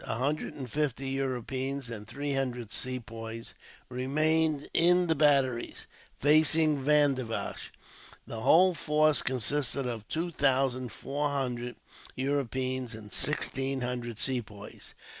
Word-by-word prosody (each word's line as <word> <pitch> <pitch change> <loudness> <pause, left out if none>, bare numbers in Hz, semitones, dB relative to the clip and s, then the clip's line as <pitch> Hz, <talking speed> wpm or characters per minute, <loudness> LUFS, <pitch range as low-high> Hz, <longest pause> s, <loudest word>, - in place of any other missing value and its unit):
A - - -2
hundred 140 +6 -2
and 130 -3 -6
fifty 135 0 -1
Europeans 135 0 -3
and 105 -2 -7
three 145 +3 -3
hundred 125 -4 -2
Sepoys 115 -2 -5 0.3
remained 150 +4 +1
in 180 +2 +4
the 165 - +3
batteries, 140 -5 +2 0.3
facing 155 0 +4
Vandivash. 140 -5 +1 0.5
The 115 - -6
whole 175 +10 +5
force 155 -1 +3
consisted 135 +2 0
of 115 -4 -4
two 170 +2 -2
thousand 130 -4 +1
four 145 +5 -2
hundred 125 -3 -2 0.4
Europeans, 130 -2 -2
and 105 -2 -10
sixteen 135 0 0
hundred 120 -2 -3
Sepoys. 110 -6 -5
135 Hz, 115 wpm, -29 LUFS, 125-145 Hz, 0.5 s, whole